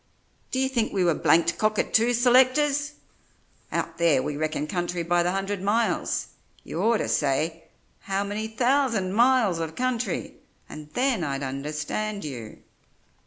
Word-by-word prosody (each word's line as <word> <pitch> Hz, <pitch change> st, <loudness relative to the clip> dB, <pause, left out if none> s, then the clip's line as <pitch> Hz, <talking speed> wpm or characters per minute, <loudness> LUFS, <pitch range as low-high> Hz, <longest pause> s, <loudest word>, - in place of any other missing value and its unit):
D'ye 265 Hz, 0 st, 0 dB
think 240 Hz, -4 st, -1 dB
we 190 Hz, -2 st, +1 dB
were 170 Hz, -2 st, +3 dB
blanked 165 Hz, +2 st, +2 dB
cockatoo 220 Hz, +2 st, +2 dB
selectors! 265 Hz, +4 st, +3 dB, 0.8 s
Out -, -, -3 dB
there 155 Hz, -6 st, +3 dB
we 145 Hz, -, -3 dB
reckon 155 Hz, 0 st, -2 dB
country 175 Hz, +1 st, -2 dB
by 175 Hz, +1 st, +2 dB
the 175 Hz, -, +1 dB
hundred 195 Hz, +1 st, -2 dB
miles. 220 Hz, +3 st, 0 dB, 0.3 s
You -, -, -4 dB
orter 230 Hz, 0 st, +2 dB
say, 160 Hz, +3 st, 0 dB, 0.3 s
'How 195 Hz, 0 st, -2 dB
many 205 Hz, +2 st, -3 dB
thousand 230 Hz, -4 st, +1 dB
miles 235 Hz, -6 st, +3 dB
of 160 Hz, -1 st, -4 dB
country?' 250 Hz, -1 st, -2 dB, 0.3 s
and 150 Hz, -1 st, -10 dB
then 250 Hz, -7 st, +1 dB
I'd 140 Hz, -2 st, -3 dB
understand 150 Hz, +10 st, -4 dB
you." 120 Hz, -7 st, -8 dB
200 Hz, 135 wpm, -25 LUFS, 160-240 Hz, 0.8 s, were